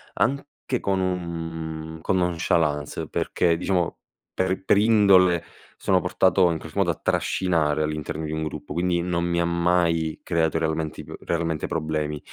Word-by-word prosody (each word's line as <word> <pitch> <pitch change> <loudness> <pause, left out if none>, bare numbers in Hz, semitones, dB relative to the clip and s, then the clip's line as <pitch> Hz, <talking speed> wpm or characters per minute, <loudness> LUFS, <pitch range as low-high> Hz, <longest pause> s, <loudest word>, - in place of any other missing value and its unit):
anche 140 -1 -1
con 95 -1 0
un 80 -3 -4
con 95 - +1
nonchalance, 80 -4 0
perché 85 -2 +1
diciamo, 90 0 -1 0.3
per 95 +1 -1
per - - +4
indole 95 -6 +5 0.3
sono 95 -1 +2
portato 90 +1 +3
in 85 - -1
qualche - - -10
modo - - +2
a - - +1
trascinare 80 -5 +1
all'interno 75 +1 -3
di 75 - -4
un 80 - -2
gruppo. 75 - -6
Quindi 85 +1 +1
non 85 -1 -1
mi 85 0 0
ha 85 - +2
mai 85 -2 +1
creato 80 -2 +1
realmenti 80 -1 -2
p - - -10
realmente 85 -2 -2
problemi. 75 -2 -2
85 Hz, 150 wpm, -24 LUFS, 80-90 Hz, 0.3 s, indole